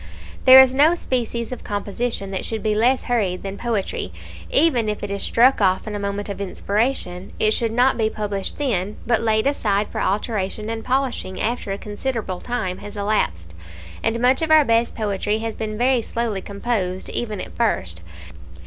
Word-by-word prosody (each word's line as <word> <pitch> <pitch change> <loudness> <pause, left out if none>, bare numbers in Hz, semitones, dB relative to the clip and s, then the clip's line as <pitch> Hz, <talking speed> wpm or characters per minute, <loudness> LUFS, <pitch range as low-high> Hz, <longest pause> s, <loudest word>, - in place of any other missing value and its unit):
There 260 0 +10
is 260 -1 +7
no 300 +5 +5
species 235 -6 -2
of 250 - -6
composition 205 0 -3
that 190 - -2
should 220 -2 -3
be 215 - +1
less 245 +5 +2
hurried 205 -7 -1
than 195 0 -5
poetry. 205 - -2 0.4
Even 265 -8 +3
if 210 - -4
it 205 - -4
is 200 - -3
struck 250 +1 +4
off 190 -1 +2
in 215 - -5
a 205 - -3
moment 200 0 -3
of 200 -1 -5
inspiration, 200 -2 -1
it 215 - +2
should 225 0 +1
not 245 +2 +3
be 220 -1 +2
published 205 -3 -4
then, 210 -8 -1
but 235 -1 +2
laid 220 0 +1
aside 210 -7 +1
for - - -4
alteration 210 +1 -1
and 225 -1 -4
polishing 255 -7 -1
after 230 -3 -2
a 195 - -2
considerable 210 -3 -4
time 190 -7 -3
has 205 +1 -9
elapsed; 85 - -1 0.5
and 225 +1 0
much 255 +4 +3
of 320 - -1
our 310 -2 +6
best 230 0 +2
poetry 210 -1 -1
has 225 0 -4
been 215 -1 -4
very 250 +1 +2
slowly 225 -3 -3
composed, 200 -3 -3
even 215 -4 -3
at - - -8
first. 90 - -1
215 Hz, 185 wpm, -22 LUFS, 200-240 Hz, 0.5 s, There